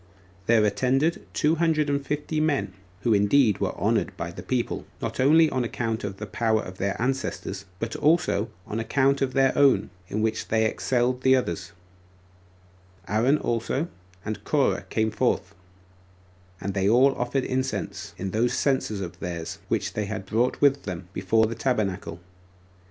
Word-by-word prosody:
There 115 -2 +5
attended 135 +9 +1
two 155 +2 +1
hundred 160 -2 +2
and 140 -1 0
fifty 150 +2 -2
men, 140 -11 0 0.3
who 115 - +2
indeed 105 +2 +4
were - - -2
honored - - 0
by 85 0 -4
the - - -8
people, 125 -2 -2
not - - -4
only 155 +5 +6
on 130 - 0
account 115 -1 -2
of 100 -1 -4
the 105 - -5
power 110 +2 0
of 95 0 -9
their 100 0 -1
ancestors, 120 -6 -2
but 115 +3 -4
also 150 -8 +2 0.2
on 110 - -4
account 135 +5 +2
of 130 -1 0
their 135 0 +3
own, 135 -8 +4 0.2
in 110 +4 -2
which 110 - -1
they 110 0 +2
excelled 125 +2 0
the 130 0 +5
others: 85 -10 -2 1.4
Aaron 120 +8 +3
also 125 +6 -1 0.4
and 110 0 -4
Corah - - +1
came 110 0 0
forth, - - 0 1.1
and 100 - -3
they 95 0 +1
all 130 +4 +5
offered 125 +2 -1
incense, 130 +1 -3
in 95 0 -4
those 115 +4 +1
censers 130 -7 0
of 90 -3 -6
theirs 85 -3 -5
which - - -1
they 105 -1 -2 0.2
brought 115 +6 0
with 140 -1 +4
them, 90 -2 -6
before 110 +4 +2
the 110 - -3
tabernacle. 105 -8 -2
115 Hz, 160 wpm, -25 LUFS, 105-135 Hz, 1.4 s, only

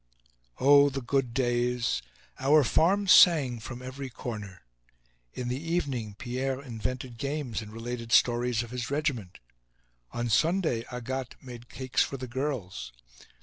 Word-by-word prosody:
Oh! 145 +1 +7
the 135 -1 -5
good 130 0 0
days! 120 - 0 0.4
Our 145 +3 +5
farm 190 - +3
sang 150 -10 +6
from 120 +2 -8
every 130 +1 -6
corner. 105 - -7 0.7
In 125 - -4
the 125 +3 -2
evening, 140 -11 -2
Pierre 130 +2 -2
invented 125 -1 -5
games 140 -5 -3
and 105 -1 -10
related 115 +1 -6
stories 120 0 +3
of 120 - -10
his 125 -2 -4
regiment. 135 -10 -2 0.7
On 120 0 -2
Sunday 155 - +1
Agathe 125 +1 -4
made 120 -2 -11
cakes 130 -1 -1
for 135 - -1
the 130 - -5
girls. 120 - -4
125 Hz, 135 wpm, -28 LUFS, 120-140 Hz, 0.7 s, Oh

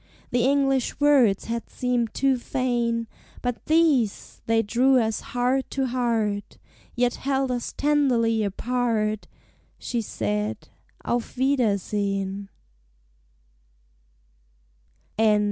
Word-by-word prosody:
The 245 -1 +2
English 270 -2 +1
words 270 -9 +4
had 230 0 -4
seemed 245 -3 -1
too 270 -2 +2
fain, 240 -2 -1 0.4
But 245 -2 -3
these 305 -10 +2
they 225 0 +3
drew 255 +5 +3
us 220 -2 0
heart 250 +2 -1
to 270 - +2
heart, 230 -5 -1 0.4
Yet 245 0 +2
held 270 -1 0
us 245 -1 -3
tenderly 245 -7 +2
apart; 215 0 -1 0.5
She 235 - -2
said, 105 - -3 0.4
"Auf 240 +1 -2
wiedersehen!" 200 -6 0
240 Hz, 95 wpm, -25 LUFS, 215-260 Hz, 0.5 s, words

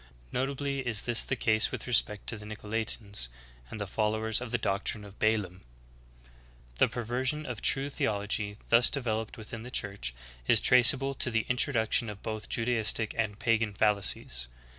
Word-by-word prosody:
Notably 140 +1 -1
is 120 -6 -1
this 120 -1 +4
the 130 - 0
case 110 -2 +2
with - - -5
respect 105 -4 0
to - - -2
the - - -10
Nicolaitanes, 105 - -2 0.4
and 110 - -7
the 105 - -2
followers 110 +2 0
of 125 - -5
the 120 - +1
doctrines 105 0 -1
of 100 0 -14
Balaam.^ 105 -4 +1 0.6
4. - - -23 0.5
The - - +6
perversion 130 +6 -1
of 120 -5 -5
true 140 +1 +2
theolog}^ 105 -2 -1
thus 115 +1 +6
developed 115 -5 -2
within 110 0 -8
the 120 - -8
Church 100 - -2 0.3
is - - +5
traceable 125 +2 +5
to 130 - -1
the 110 -1 0
introduction 120 -3 +2
of 105 -1 -9
both 110 -1 -5
Judaistic 115 -2 +1
and 105 -3 -1
pagan 110 -3 +1
fallacies. 100 - 0
110 Hz, 160 wpm, -30 LUFS, 105-125 Hz, 0.6 s, The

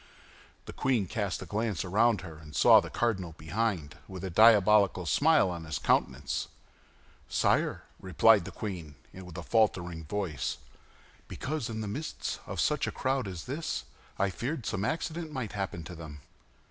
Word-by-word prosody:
The - - -8
queen 125 -6 +1
cast 100 -1 -3
a - - -8
glance 105 -3 -2
around 105 +2 +3
her, 80 -4 -10
and 75 -1 -12
saw - - +8
the - - -5
cardinal 95 -9 -1
behind, 85 -1 -2
with 95 -1 -8
a 95 - -3
diabolical 105 -2 +5
smile 145 - +4
on 85 -2 -6
his 80 -1 -3
countenance. - - 0 0.8
"Sire," - - +1 0.2
replied 95 +2 +4
the - - -6
queen, 85 -8 -6 0.2
with 90 -2 -10
a 85 - -5
faltering 90 -6 +1
voice, 90 -2 -3 0.7
"because, 140 -3 -4
in 110 -1 -4
the 105 - -4
midst 145 +10 -4
of - - -5
such - - +1
a - - -2
crowd 130 -3 -1
as 90 -3 -6
this, 140 - -3 0.3
I 100 0 +1
feared 125 - -4
some 100 -3 -2
accident 160 +5 -2
might 130 -7 -4
happen 95 -4 -4
to 90 - -8
them." 80 -3 -9
100 Hz, 160 wpm, -30 LUFS, 85-115 Hz, 0.8 s, saw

